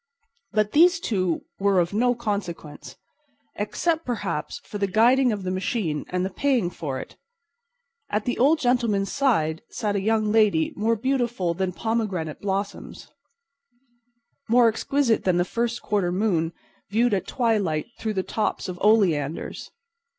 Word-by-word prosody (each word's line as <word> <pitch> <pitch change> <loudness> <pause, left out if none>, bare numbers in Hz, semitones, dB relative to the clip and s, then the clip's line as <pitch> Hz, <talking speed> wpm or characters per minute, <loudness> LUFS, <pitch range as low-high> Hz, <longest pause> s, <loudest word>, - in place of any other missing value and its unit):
But 215 -1 +1
these 340 +3 +5
two 185 - -1 0.2
were 200 -1 +3
of 175 +2 0
no 245 +3 +2
consequence—except, 210 - -5
perhaps, 205 -10 -3
for 205 - -6
the 200 - +1
guiding 240 +6 +4
of 205 -3 -3
the 185 - -2
machine 185 -5 -2
and 180 0 -1
the 190 - -3
paying 250 -7 +1
for 135 -7 -4
it. - - -10 0.9
At 210 0 -1
the 245 - -2
old 290 +6 +5
gentleman's 235 -7 +1
side 205 - +1
sat 210 -4 -2
a 200 - 0
young 215 0 +1
lady 210 -8 +3
more 225 +2 +1
beautiful 240 -7 0
than 190 +1 -1
pomegranate 195 -7 -2
blossoms, 200 0 -4 1.4
more 240 +1 +6
exquisite 230 +2 +1
than 185 -2 +2
the 175 - +2
first 235 +3 -2
quarter 200 -4 0
moon 180 -4 0 0.4
viewed 225 +3 +2
at 195 - -1
twilight 210 - 0
through 220 -1 -2
the 190 - 0
tops 215 0 -2
of 180 -1 -6
oleanders. 175 -9 +1
210 Hz, 145 wpm, -24 LUFS, 185-235 Hz, 1.4 s, more